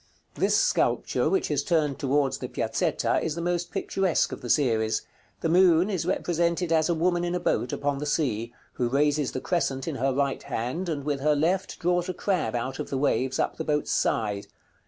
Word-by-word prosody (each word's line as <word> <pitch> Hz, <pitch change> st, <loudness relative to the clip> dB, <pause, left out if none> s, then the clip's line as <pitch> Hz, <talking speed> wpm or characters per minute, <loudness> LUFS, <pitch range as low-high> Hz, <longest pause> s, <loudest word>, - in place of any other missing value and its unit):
This -, -, +2 dB
sculpture, -, -, +1 dB
which 385 Hz, -, 0 dB
is 145 Hz, -1 st, +1 dB
turned 155 Hz, -5 st, +1 dB
towards 140 Hz, 0 st, +1 dB
the -, -, -4 dB
Piazzetta, -, -, 0 dB
is 160 Hz, -2 st, -2 dB
the -, -, -4 dB
most 175 Hz, 0 st, -1 dB
picturesque 190 Hz, -4 st, 0 dB
of -, -, -6 dB
the 120 Hz, -, -6 dB
series. 110 Hz, -6 st, +2 dB, 0.4 s
The -, -, 0 dB
moon 180 Hz, +2 st, +5 dB
is 185 Hz, -5 st, -2 dB
represented 170 Hz, 0 st, 0 dB
as 160 Hz, +1 st, +3 dB
a 170 Hz, -, +2 dB
woman 175 Hz, +1 st, +1 dB
in 175 Hz, 0 st, -1 dB
a -, -, 0 dB
boat, 125 Hz, -, 0 dB
upon 145 Hz, -1 st, -1 dB
the 150 Hz, -, -3 dB
sea, 120 Hz, -7 st, -1 dB, 0.2 s
who 120 Hz, -1 st, -1 dB
raises 145 Hz, +1 st, +1 dB
the 130 Hz, -, -3 dB
crescent 135 Hz, -7 st, -1 dB
in -, -, -3 dB
her 135 Hz, +3 st, +1 dB
right 140 Hz, +1 st, 0 dB
hand, 130 Hz, +11 st, -3 dB
and 145 Hz, -3 st, -2 dB
with 145 Hz, -1 st, -1 dB
her 150 Hz, +2 st, +2 dB
left 175 Hz, +6 st, 0 dB
draws 175 Hz, +1 st, 0 dB
a 185 Hz, -, -3 dB
crab 165 Hz, -, -1 dB
out 130 Hz, +3 st, -3 dB
of -, -, -4 dB
the 135 Hz, -, -2 dB
waves, 130 Hz, -1 st, +1 dB
up -, -, -1 dB
the 160 Hz, -, -3 dB
boat's 150 Hz, -1 st, -1 dB
side. 105 Hz, -3 st, 0 dB
150 Hz, 205 wpm, -26 LUFS, 135-175 Hz, 0.4 s, moon